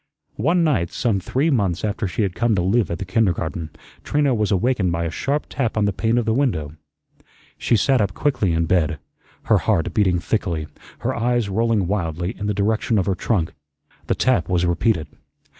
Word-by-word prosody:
One 165 Hz, +9 st, +2 dB
night, 130 Hz, -, +1 dB
some 110 Hz, -5 st, 0 dB
three 140 Hz, -, 0 dB
months 100 Hz, -, 0 dB
after 105 Hz, 0 st, -2 dB
she 100 Hz, +4 st, -1 dB
had 95 Hz, -3 st, -1 dB
come 115 Hz, +2 st, +1 dB
to 90 Hz, -, +1 dB
live 100 Hz, +1 st, +2 dB
at 85 Hz, -, -2 dB
the 100 Hz, -, -5 dB
kindergarten, 85 Hz, -5 st, -1 dB, 0.3 s
Trina 145 Hz, -2 st, +1 dB
was 105 Hz, -3 st, 0 dB
awakened 100 Hz, -2 st, +1 dB
by 85 Hz, 0 st, -1 dB
a 80 Hz, -, -2 dB
sharp 140 Hz, -, -1 dB
tap 120 Hz, -5 st, -2 dB
on 105 Hz, -, +3 dB
the 100 Hz, -, 0 dB
pane 115 Hz, +5 st, 0 dB
of 120 Hz, -, +1 dB
the 110 Hz, -, +1 dB
window. 110 Hz, -, 0 dB, 0.9 s
She -, -, +2 dB
sat 130 Hz, +3 st, +3 dB
up 95 Hz, -2 st, -1 dB
quickly 135 Hz, -10 st, +1 dB
in 85 Hz, 0 st, +1 dB
bed, 80 Hz, -2 st, +1 dB, 0.5 s
her -, -, +3 dB
heart 80 Hz, -, 0 dB
beating 95 Hz, -4 st, +2 dB
thickly, 85 Hz, -3 st, -1 dB, 0.4 s
her -, -, -1 dB
eyes 120 Hz, -2 st, 0 dB
rolling 110 Hz, 0 st, +1 dB
wildly 90 Hz, -2 st, -2 dB
in 105 Hz, -, -4 dB
the 105 Hz, -, -1 dB
direction 110 Hz, +2 st, +1 dB
of 95 Hz, -, +1 dB
her 95 Hz, -, +1 dB
trunk. 90 Hz, -2 st, -1 dB, 0.5 s
The -, -, +1 dB
tap 125 Hz, -10 st, +1 dB
was 90 Hz, -1 st, +2 dB
repeated. 85 Hz, 0 st, +1 dB
100 Hz, 195 wpm, -21 LUFS, 90-115 Hz, 0.9 s, on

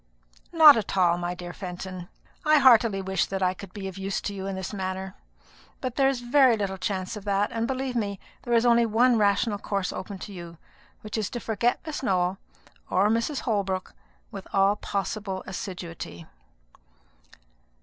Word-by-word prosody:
"Not 310 Hz, -5 st, +9 dB
at 205 Hz, -2 st, -3 dB
all, 175 Hz, -2 st, +3 dB
my 175 Hz, 0 st, -3 dB
dear 175 Hz, -1 st, -8 dB
Fenton. 185 Hz, -1 st, -7 dB, 0.3 s
I 305 Hz, 0 st, +5 dB
heartily 230 Hz, -7 st, +5 dB
wish 190 Hz, -2 st, 0 dB
that 195 Hz, -1 st, -2 dB
I 185 Hz, 0 st, +2 dB
could 200 Hz, -1 st, -11 dB
be 195 Hz, -1 st, -6 dB
of 190 Hz, 0 st, -8 dB
use 195 Hz, 0 st, -2 dB
to 205 Hz, -, -4 dB
you 195 Hz, -1 st, -5 dB
in 195 Hz, -, -3 dB
this 190 Hz, +2 st, -5 dB
matter; 190 Hz, -1 st, -4 dB, 0.7 s
but 255 Hz, -2 st, -4 dB
there 270 Hz, -1 st, +4 dB
is 265 Hz, -3 st, -2 dB
very 250 Hz, -1 st, +4 dB
little 195 Hz, -2 st, -3 dB
chance 190 Hz, 0 st, -3 dB
of 210 Hz, -, -8 dB
that; 200 Hz, 0 st, +1 dB
and, 230 Hz, 0 st, -1 dB
believe 265 Hz, 0 st, -3 dB
me, 200 Hz, -4 st, -2 dB, 0.2 s
there 240 Hz, -1 st, 0 dB
is 230 Hz, +1 st, +3 dB
only 235 Hz, -1 st, +5 dB
one 235 Hz, +2 st, +3 dB
rational 205 Hz, +1 st, +2 dB
course 195 Hz, -2 st, -2 dB
open 195 Hz, +1 st, -6 dB
to 200 Hz, +2 st, -9 dB
you, 170 Hz, -2 st, -9 dB, 0.4 s
which 215 Hz, +1 st, -4 dB
is, 210 Hz, -, -2 dB
to 240 Hz, -, -5 dB
forget 230 Hz, +2 st, 0 dB
Miss 310 Hz, -2 st, -4 dB
Nowell, 185 Hz, -5 st, 0 dB, 0.5 s
or 195 Hz, +3 st, +3 dB
Mrs. 230 Hz, +6 st, 0 dB
Holbrook, 195 Hz, -4 st, -2 dB, 0.4 s
with 195 Hz, -3 st, -8 dB
all 195 Hz, +1 st, +3 dB
possible 200 Hz, -1 st, -3 dB
assiduity." 170 Hz, -, -7 dB
200 Hz, 180 wpm, -26 LUFS, 190-230 Hz, 0.7 s, Not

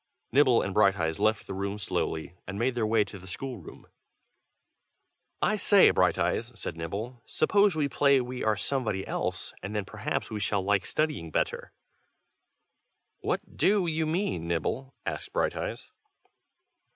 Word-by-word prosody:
Nibble 130 Hz, -3 st, +5 dB
and 100 Hz, -, -3 dB
Brighteyes 95 Hz, -6 st, +2 dB
left 110 Hz, -1 st, +2 dB
the -, -, -6 dB
room 100 Hz, +1 st, -3 dB
slowly, 85 Hz, -4 st, -2 dB
and 100 Hz, -, -5 dB
made 125 Hz, +4 st, +1 dB
their 115 Hz, -3 st, 0 dB
way 110 Hz, -1 st, +4 dB
to 100 Hz, 0 st, -10 dB
the 95 Hz, -, -13 dB
school 125 Hz, +5 st, -4 dB
room. 80 Hz, -, -12 dB, 1.6 s
"I -, -, +2 dB
say, -, -, +6 dB
Brighteyes!" 120 Hz, +1 st, +1 dB
said 85 Hz, -, -4 dB
Nibble, 105 Hz, +9 st, -5 dB
"suppose 200 Hz, +3 st, +3 dB
we 150 Hz, -2 st, +1 dB
play 140 Hz, 0 st, +4 dB
we 125 Hz, 0 st, -4 dB
are 110 Hz, -1 st, +2 dB
somebody 110 Hz, -3 st, -1 dB
else, -, -, -3 dB
and 105 Hz, +2 st, -5 dB
then 105 Hz, -2 st, -1 dB
perhaps -, -, -3 dB
we 110 Hz, -, -3 dB
shall 100 Hz, 0 st, 0 dB
like 100 Hz, -1 st, +1 dB
studying 150 Hz, -, -1 dB
better." -, -, -1 dB, 1.5 s
"What -, -, -3 dB
do 200 Hz, -2 st, +3 dB
you 160 Hz, -1 st, 0 dB
mean, 155 Hz, -, -1 dB
Nibble?" 125 Hz, -, -2 dB
asked -, -, -4 dB
Brighteyes. -, -, -2 dB
110 Hz, 150 wpm, -28 LUFS, 95-135 Hz, 1.6 s, say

